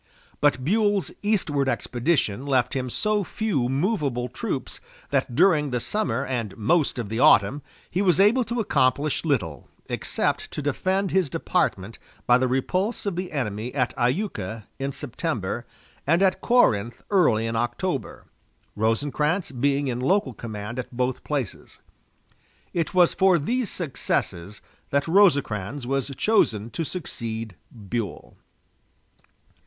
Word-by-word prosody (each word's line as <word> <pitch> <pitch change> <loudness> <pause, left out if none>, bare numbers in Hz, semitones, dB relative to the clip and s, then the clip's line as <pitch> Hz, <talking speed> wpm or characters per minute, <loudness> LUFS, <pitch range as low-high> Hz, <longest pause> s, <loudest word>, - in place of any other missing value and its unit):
But 145 -3 +2
Buell's 205 +1 +2
eastward 160 -10 +1
expedition 125 -2 0
left 130 -3 +2
him 130 -1 -2
so 210 - +1
few 175 - -1
movable 135 - 0
troops - - -4 0.3
that 120 - 0
during 155 -3 +4
the 125 -1 -1
summer 135 - -1
and 115 -6 -3
most 140 +7 +2
of 120 -4 -3
the 110 +3 -3
autumn 120 +5 +5 0.3
he 185 - -1
was 185 -2 +3
able 220 +6 +5
to 235 +2 -3
accomplish 145 - +1
little 105 - -1 0.2
except - - -1
to - - -3
defend 185 +7 0
his 185 -6 +2
department 100 -3 -1 0.3
by 120 0 +5
the 130 - +2
repulse 185 - -1
of 200 -3 -1
the 180 0 -4
enemy 115 -4 -3
at 125 -3 +1
Iuka 120 - -1 0.2
in 135 +1 -2
September, 125 - -4 0.4
and 170 +5 +4
at 185 -1 +2
Corinth 120 - +2
early 125 - +3
in 115 0 -2
October, 120 +7 -2 0.5
Rosecrans 145 - 0
being 140 +2 +1
in 125 -2 -2
local 145 0 +1
command 110 +1 -6
at 125 - -5
both 125 +1 -2
places. 140 -8 -4 1.0
It 170 0 -1
was 180 -2 +5
for 190 -2 +4
these 235 - -1
successes 105 - -3 0.3
that 140 +2 +1
Rosecrans 145 - +2
was 135 +1 -1
chosen 115 - +2
to 165 - -2
succeed 115 - -5 0.2
Buell. 110 0 -5
135 Hz, 135 wpm, -25 LUFS, 120-180 Hz, 1.0 s, autumn